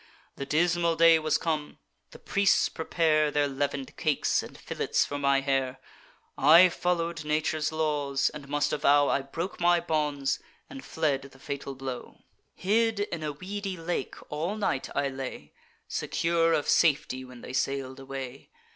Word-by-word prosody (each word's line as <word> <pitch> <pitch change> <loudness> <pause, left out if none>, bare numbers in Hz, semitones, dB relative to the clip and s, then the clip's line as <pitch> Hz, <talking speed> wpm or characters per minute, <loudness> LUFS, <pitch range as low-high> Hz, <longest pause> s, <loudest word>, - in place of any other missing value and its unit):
The 140 - -6
dismal 170 +2 +2
day 165 0 +6
was 155 0 +1
come; 155 -3 -3 0.3
the - - -13
priests 200 -1 +2
prepare 160 -2 +1
Their 145 0 +1
leaven'd 140 -1 -3
cakes, 150 -3 +1
and - - -11
fillets - - -1
for 145 - -4
my 140 -1 +3
hair. 135 -1 -1 0.6
I 165 +6 +7
follow'd 170 -2 -1
nature's 155 0 0
laws, 145 -3 0
and 150 -2 -9
must 145 0 0
avow 145 -1 +4
I 140 - +1
broke 165 +7 -5
my 175 0 +4
bonds 150 -4 -1 0.3
and 270 -1 -8
fled 150 -4 0
the 135 -1 -14
fatal 140 0 -6
blow. 130 -1 -7 0.3
Hid 220 +2 +1
in 170 -5 -3
a 150 -1 -2
weedy 195 +4 -5
lake 170 +1 -3
all 165 +7 -2
night 200 -11 -1
I 140 - +1
lay, 135 -1 -7 0.3
Secure 165 0 +1
of 150 -3 +1
safety 140 -5 +2
when 125 -1 -12
they - - -8
sail'd 135 0 -2
away. 135 -1 -7
150 Hz, 155 wpm, -28 LUFS, 140-170 Hz, 0.6 s, I